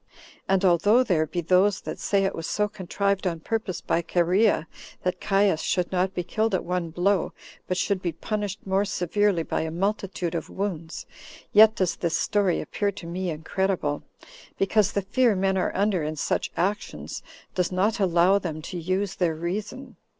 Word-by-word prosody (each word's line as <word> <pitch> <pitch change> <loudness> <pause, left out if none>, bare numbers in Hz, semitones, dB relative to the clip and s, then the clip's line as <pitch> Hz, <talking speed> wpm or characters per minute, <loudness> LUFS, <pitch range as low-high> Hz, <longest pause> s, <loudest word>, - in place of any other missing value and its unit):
And 195 0 +3
although 205 +8 +5
there 165 -9 +1
be 175 +3 -2
those 185 +4 +3
that - - -6
say 200 -1 +1
it 195 - 0
was 165 - -5
so 210 0 +1
contrived 200 0 -1
on 165 -2 -2
purpose 215 +1 -3
by 170 - 0
Chorea, 180 +4 +2 0.4
that 180 0 -1
Caius 195 -5 +2
should 180 -2 0
not 185 +1 0
be 180 - -1
killed 215 +4 0
at - - -1
one 180 -1 -2
blow, 180 +3 +1 0.3
but 185 - -1
should 195 -1 0
be 175 - -1
punished 205 +3 -4
more 190 +1 +2
severely 200 -1 +1
by - - -2
a 160 - -2
multitude 185 0 -2
of 170 - -4
wounds; 175 -5 -4 0.5
yet 220 +1 +8
does 185 -2 0
this 170 -2 0
story 200 -4 +1
appear 205 -1 -1
to 195 -3 -10
me 180 +2 -3
incredible, 160 -1 -1 0.6
because 200 +1 +2
the 200 - 0
fear 230 +3 +2
men 190 0 +1
are 185 - 0
under 200 -2 +1
in 155 +1 -3
such 150 - -1
actions 200 +4 -2 0.3
does 180 -1 0
not 195 +5 +1
allow 185 +1 +4
them 160 -5 -4
to 180 +1 -5
use 185 +3 -1
their 170 -3 0
reason. 200 - -5
185 Hz, 180 wpm, -25 LUFS, 175-200 Hz, 0.6 s, yet